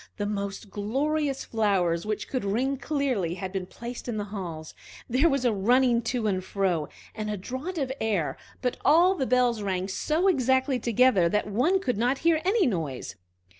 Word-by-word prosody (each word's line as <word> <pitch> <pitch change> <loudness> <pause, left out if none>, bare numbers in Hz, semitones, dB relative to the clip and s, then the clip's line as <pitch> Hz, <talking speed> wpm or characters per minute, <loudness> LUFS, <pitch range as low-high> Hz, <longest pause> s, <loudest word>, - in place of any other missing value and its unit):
The 205 - -2
most 200 0 -4
glorious 275 +7 -1
flowers, 195 -5 +1
which 215 -1 -2
could 255 -4 -2
ring 250 +8 0
clearly, 260 - -1
had 190 0 -5
been 190 -2 -4
placed 235 +4 -8
in 235 -3 -2
the 205 - -1
halls. 165 -6 -6 0.3
There 265 +8 +3
was 275 -3 0
a 240 - +3
running 240 +4 +3
to 245 -3 -1
and 190 -3 0
fro, 185 -6 -1 0.2
and 215 -1 -4
a 210 - -2
draught 260 - -5
of 270 -4 -1
air, 205 -8 0 0.3
but 250 - 0
all 350 +4 +5
the 270 -9 -2
bells 245 -3 +2
rang 190 -2 -1
so 310 - 0
exactly 260 -4 +2
together 230 -6 +3
that 210 +4 0
one 250 - +2
could 250 - -2
not 250 +3 +2
hear 325 -2 +4
any 390 +2 +3
noise. 160 - -3
235 Hz, 180 wpm, -27 LUFS, 195-265 Hz, 0.3 s, all